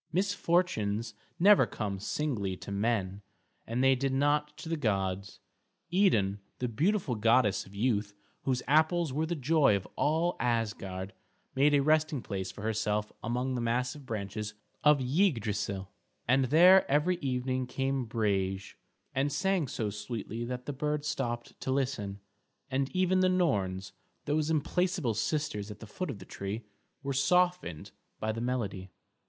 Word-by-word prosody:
Misfortunes 170 - +1 0.3
never 200 +3 +6
come 100 -3 -4
singly 105 -6 -2
to - - -8
men, 100 -2 -1 0.5
and 120 +3 0
they 135 0 +6
did 135 +1 0
not 150 +2 +1
to - - -8
the 165 - 0
gods. 100 - -1 0.5
Idun, 105 - +3 0.2
the 125 - -1
beautiful 160 - +1
goddess 115 -3 +3
of 100 - -14
youth, 105 -2 0 0.3
whose 130 -2 -1
apples 160 +1 +3
were 155 +3 0
the 170 - -1
joy 145 -5 +3
of 95 - -3
all 165 +4 +1
Asgard, 105 -5 -2 0.4
made 145 +2 +4
a 140 - +4
resting 155 -2 +2
place 95 -2 -4
for 105 - -10
herself 105 -1 -1
among 125 +3 -1
the 125 - -1
massive 125 +4 -1
branches 105 -1 -4 0.3
of 150 -2 +5
Yggdrasil, 110 - 0 0.4
and 130 +2 +4
there 175 +8 +6
every 150 +6 +2
evening 130 -2 -1
came 135 0 -1
Brage, 100 -3 -1 0.4
and 140 +2 +1
sang 180 +1 +1
so 110 -3 -2
sweetly 110 +2 -5
that 125 +1 -5
the 145 - -3
birds 150 +2 -2
stopped 120 -5 -3
to - - -4
listen, 130 -7 -1 0.5
and 135 +1 0
even 185 0 +3
the 185 0 +4
Norns, 100 - 0 0.3
those 150 +1 0
implacable 160 - +1
sisters 110 -3 -2
at 105 -1 -9
the - - -9
foot 180 - -5
of 130 - -4
the - - -11
tree, 100 +4 -5 0.4
were 140 0 -2
softened 180 - +1 0.3
by 110 - -1
the 115 +1 -4
melody. 105 -7 -2
125 Hz, 150 wpm, -30 LUFS, 105-150 Hz, 0.5 s, never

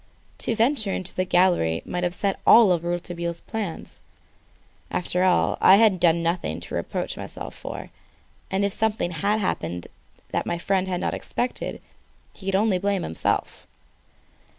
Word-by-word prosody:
To 230 - -1
venture 225 -2 +3
into 185 - -1
the 185 - -1
gallery 175 - +2
might 180 0 -3
upset 185 +3 -1
all 200 -7 +7
Rouletabille's 170 0 -4
plans. 210 -7 -6 0.9
After 180 0 -1
all, 185 -1 +2
I 190 - +8
had 200 -4 +4
nothing 170 +1 -1
to - - -8
reproach - - -3
myself - - -6
for, - - -8 0.6
and 195 +1 +1
if 200 - -1
something 220 -5 0
had 200 +5 0
happened 85 - -2 0.5
that - - -1
my 170 - -1
friend 190 +1 0
had 180 -1 -2
not - - -1
expected 245 +1 -3 0.5
he 195 - -11
could 195 - +1
only 200 -2 +2
blame 200 0 0
himself. 80 - -2
185 Hz, 145 wpm, -24 LUFS, 175-200 Hz, 0.9 s, I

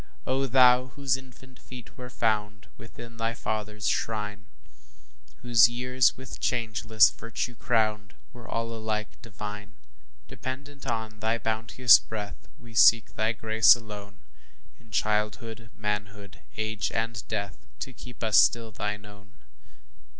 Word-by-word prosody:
O 135 +1 0
Thou, 125 0 +5
whose 140 -3 +1
infant 130 0 -13
feet 125 -2 -12
were 125 0 -9
found 105 -3 -1
Within 115 0 -12
thy 115 +1 -2
Father's 105 -2 -3
shrine, 105 -2 -2 1.0
Whose 120 -2 +6
years, 125 +1 +1
with 130 -1 -9
changeless 110 -2 +2
virtue 115 +1 -5
crowned, 110 -3 -1 0.2
Were 120 -2 -12
all 115 0 -3
alike 110 -1 -4
divine; 105 -2 -8 0.5
Dependent 140 +1 -8
on 110 -2 -3
thy 110 +2 0
bounteous 115 +2 +4
breath, 105 -4 -7
We 115 -1 -15
seek 110 0 +5
thy 110 +1 0
grace 110 0 +5
alone, 105 -3 -10 0.6
In 115 - -22
childhood, 110 +2 -2
manhood, 105 -2 -5 0.2
age, 110 -1 -2
and 115 0 -2
death, 100 -1 -5
To 130 - -5
keep 125 0 -11
us 110 -1 +5
still 115 -1 +3
thine 105 0 -4
own. 100 -1 -16
110 Hz, 130 wpm, -27 LUFS, 105-120 Hz, 1.0 s, Whose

